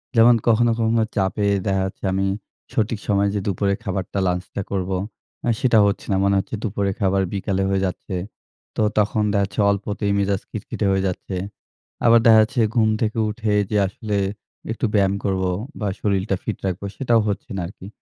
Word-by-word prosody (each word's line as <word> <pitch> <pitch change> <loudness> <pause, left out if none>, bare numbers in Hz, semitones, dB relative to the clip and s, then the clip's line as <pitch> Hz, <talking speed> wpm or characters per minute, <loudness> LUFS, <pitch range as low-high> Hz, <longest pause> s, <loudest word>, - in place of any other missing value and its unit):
যেমন 115 +1 +7
কখনো, 115 +1 +4
কখনো 115 0 +2
চাপে 100 +1 0 0.2
দেখা 95 -1 +1
যাচ্ছে 95 - -8
আমি 95 +1 +1 0.5
সঠিক 110 0 0
সময়ে 100 0 +2
যে - - +1
দুপুরে 100 +1 +1
খাবারটা, 95 0 -3
lunch 90 0 -1
টা - - -1
করবো, 95 -1 -1 0.5
অ্যা 120 - +2
সেটা 120 -3 +3
হচ্ছে 100 - -1
না। 95 - +2
মনে 100 0 +3
হচ্ছে 95 - -4
দুপুরে 100 -2 -1
খাবার 95 -1 +2
বিকালে 95 -1 -1
হয়ে 95 -1 +1
যাচ্ছে। 95 +1 -4 0.6
তো - - 0 0.2
তখন 105 +1 +1
দেখা-যাচ্ছে 100 0 0
অল্পতেই 100 +1 -1
মেজাজ 100 -1 0
খিটখিটে - - -4
হয়ে 95 0 +2
যাচ্ছে। 95 +1 -4 0.7
আবার 115 0 +7
দেখা 115 -1 +8
যাচ্ছে 120 +3 +1
ঘুম 110 -2 +4
থেকে 110 0 0
উঠে 110 0 -1 0.2
যে 105 - +2
আসলে 105 +2 -3 0.5
একটু 115 - -1
ব্যায়াম 100 -2 +3
করবো 95 -2 0 0.3
বা 105 - -1
শরীরটা 100 -1 0
fit - - -3
রাখবো, 95 +1 -2
সেটাও 120 -4 +2
হচ্ছে 115 +8 -3
না - - -2
আরকি। 95 -1 -12
100 Hz, 175 wpm, -22 LUFS, 95-110 Hz, 0.7 s, দেখা